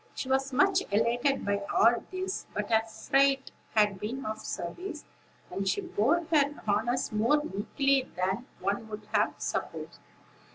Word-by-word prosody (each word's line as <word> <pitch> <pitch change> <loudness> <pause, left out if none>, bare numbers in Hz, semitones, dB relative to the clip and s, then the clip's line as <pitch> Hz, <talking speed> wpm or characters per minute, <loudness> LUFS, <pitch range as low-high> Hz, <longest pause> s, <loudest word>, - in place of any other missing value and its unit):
She - - -4
was 270 +1 +1
much 375 +8 +4
elated 235 +6 +1
by 200 0 0
all 235 +1 +4
this; 375 +1 -4
but - - -2
her 220 0 +5
fright 275 +3 +2 0.2
had 210 -3 +3
been 245 +7 -4
of 215 0 -3
service, 315 - -5 0.5
and 195 0 -2
she 405 - +1
bore 340 - +1
her 290 -1 +4
honors 225 +5 +1
more 235 +8 +2
meekly 275 +4 0
than 190 +7 -1
one 200 +3 -2
would 210 -1 -7
have - - +2
supposed. - - -4
245 Hz, 150 wpm, -29 LUFS, 210-285 Hz, 0.5 s, her